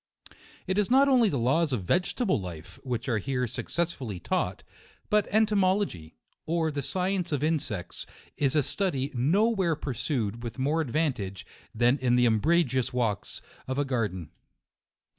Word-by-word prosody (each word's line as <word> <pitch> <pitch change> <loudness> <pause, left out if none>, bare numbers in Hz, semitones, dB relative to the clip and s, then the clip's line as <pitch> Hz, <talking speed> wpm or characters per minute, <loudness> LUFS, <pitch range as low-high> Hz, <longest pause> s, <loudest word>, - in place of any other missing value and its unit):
It 190 +2 0
is 205 - +1
not 270 +3 +5
only 250 -5 +5
the 140 - -1
laws 140 +7 +2
of 115 -7 -1
vegetable 180 - +1
life, 85 -3 -9
which 125 -1 -3
are 115 -4 +1
here 125 +1 -1
successfully 130 - -3
taught, - - -2 0.5
but 210 -1 +3
entomology, 195 - +1 0.3
or 165 -1 +1
the 145 -1 -3
science 185 +3 -1
of 145 -1 -1
in 160 0 +2
sects, 95 -9 -6 0.3
is 140 0 +1
a 150 - +4
study 145 -5 -1
no 160 - +3
where 190 -8 +1
pursued 120 -5 -2
with 120 +1 -6
more 145 +5 +1
advantage, 125 - -2 0.3
than 120 +4 +3
in 125 -1 +2
the 125 0 +4
umbrageous 130 +3 +2
walks 115 -5 -2 0.2
of 130 +1 -2
a 145 - +1
garden. 105 - -2
135 Hz, 155 wpm, -28 LUFS, 120-175 Hz, 0.5 s, not